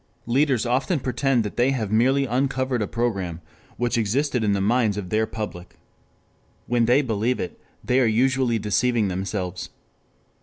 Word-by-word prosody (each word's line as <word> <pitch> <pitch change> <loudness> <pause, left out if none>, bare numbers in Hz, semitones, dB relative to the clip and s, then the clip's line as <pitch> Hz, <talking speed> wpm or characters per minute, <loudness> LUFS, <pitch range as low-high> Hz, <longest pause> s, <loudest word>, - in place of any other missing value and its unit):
3 120 - -3
Leaders 135 -3 +2
often 135 +8 0
pretend 125 -1 0
that 105 - -6
they 120 +2 +3
have 115 -7 -2
merely 130 +5 +3
uncovered 130 0 0
a 105 - -1
program 100 -8 -2 0.4
which 120 0 0
existed 125 +3 0
in 105 -1 +2
the 100 - 0
minds 110 0 +1
of 95 -3 -5
their 110 +1 +1
public. 105 -5 -7 0.9
When 120 -1 +2
they 125 +5 +4
believe 115 +1 -1
it, 90 - -6 0.2
they 125 +1 +2
are 125 - +3
usually 125 +1 +2
deceiving 110 0 +1
themselves. 90 -1 -4
120 Hz, 160 wpm, -23 LUFS, 105-130 Hz, 0.9 s, they